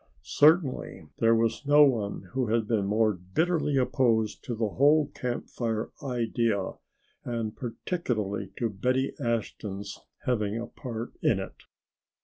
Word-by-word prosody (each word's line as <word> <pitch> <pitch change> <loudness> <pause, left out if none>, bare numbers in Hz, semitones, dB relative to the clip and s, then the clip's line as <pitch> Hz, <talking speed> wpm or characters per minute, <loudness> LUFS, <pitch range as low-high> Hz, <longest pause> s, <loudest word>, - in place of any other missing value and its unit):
Certainly 150 - +2
there 115 0 +5
was 115 +3 0
no 145 +1 +8
one 110 -9 +1
who 130 -2 0
had 110 0 +1
been 105 -4 +1
more 110 +1 +3
bitterly 145 - 0
opposed 115 -4 +1
to 120 - -3
the 110 -1 0
whole 145 +6 +4
Camp 125 -1 -3
Fire 115 -2 -3
idea 115 -6 0 0.5
and 115 -3 -3
particularly 110 - -3
to 120 - 0
Betty 125 +6 0
Ashton's 105 -5 -3 0.3
having 110 -5 0
a 120 - -4
part 115 -1 -6
in - - +3
it. - - -8
115 Hz, 130 wpm, -28 LUFS, 105-130 Hz, 0.5 s, no